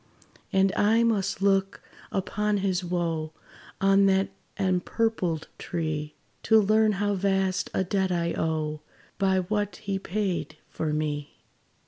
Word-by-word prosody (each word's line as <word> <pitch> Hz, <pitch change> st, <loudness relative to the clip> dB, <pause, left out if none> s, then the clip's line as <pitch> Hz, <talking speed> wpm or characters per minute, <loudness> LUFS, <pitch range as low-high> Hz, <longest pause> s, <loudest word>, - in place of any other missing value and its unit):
And 195 Hz, 0 st, +3 dB
I 220 Hz, +3 st, +4 dB
must 200 Hz, -4 st, 0 dB
look 195 Hz, -1 st, +1 dB, 0.3 s
upon 210 Hz, +2 st, 0 dB
his 185 Hz, -1 st, 0 dB
wo, 165 Hz, -3 st, -2 dB, 0.5 s
On 195 Hz, 0 st, +5 dB
that 190 Hz, 0 st, +2 dB, 0.3 s
empurpled 185 Hz, -2 st, 0 dB
tree, 155 Hz, -3 st, -3 dB, 0.3 s
To 220 Hz, -1 st, +5 dB
learn 215 Hz, +1 st, +3 dB
how 205 Hz, +1 st, 0 dB
vast 195 Hz, -1 st, 0 dB
a -, -, +2 dB
debt 190 Hz, 0 st, 0 dB
I 170 Hz, -1 st, 0 dB
owe, 155 Hz, -1 st, -2 dB, 0.4 s
By 190 Hz, -1 st, +3 dB
what 205 Hz, +2 st, -2 dB
he 200 Hz, -3 st, -3 dB
paid 190 Hz, -6 st, -2 dB
for 155 Hz, -1 st, -3 dB
me. 150 Hz, -1 st, -2 dB
190 Hz, 125 wpm, -27 LUFS, 170-200 Hz, 0.5 s, On